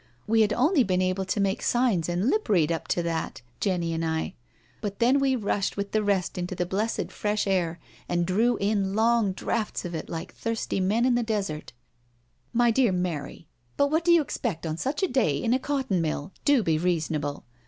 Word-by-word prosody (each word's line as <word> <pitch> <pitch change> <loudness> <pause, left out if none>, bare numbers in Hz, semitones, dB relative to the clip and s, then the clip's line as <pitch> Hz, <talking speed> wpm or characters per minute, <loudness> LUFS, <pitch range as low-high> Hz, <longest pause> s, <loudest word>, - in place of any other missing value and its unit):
We 225 +1 +3
had 215 -1 +3
only 275 - +3
been 185 -4 +1
able 185 +1 0
to 190 +3 -1
BRACKENHILL 195 0 0
HALL 245 +1 +2
41 250 - +4
make 180 -5 +1
signs 160 - -4
and 175 +5 0
lip 430 0 -1
read 170 -6 +3
up 165 - -3
to 175 - 0
that 165 -6 -3
— - - -37
Jenny 175 -4 0
and 165 0 -2
I— 160 0 -1 0.5
but 205 -2 -4
then 250 +4 +4
we 270 -1 +2
rushed, 205 -4 -1
with 200 0 -3
the 215 - +2
rest, 195 -3 0
into 180 +1 -3
the 180 - -1
blessed 205 +5 -2
fresh 210 0 -1
air, 175 -4 0 0.3
and 175 0 +1
drew 220 +6 +2
in 200 -1 0
long 225 -2 +3
draughts 210 +2 -2
of 175 - -5
it 160 - -5
like 165 +1 -6
thirsty 230 -3 -2
men 210 +6 +2
in 255 - +3
the 240 - +2
desert.'* 200 -9 -3 0.5
" 120 0 -42
My 240 -1 +5
dear 240 -2 +3
Mary, 175 -3 -3 0.3
but 285 0 +2
what 320 +2 +2
do 345 - +4
you 340 -2 +6
expect 205 - -3
on 155 -1 -2
such 275 - -2
a - - +4
day 230 - +1
in 230 +11 +1
a 260 - +2
cotton 265 -10 -1
mill?— 155 +1 -3
do 285 -6 +4
be 160 -3 +1
reasonable." 155 -4 -1
195 Hz, 225 wpm, -26 LUFS, 170-235 Hz, 0.5 s, you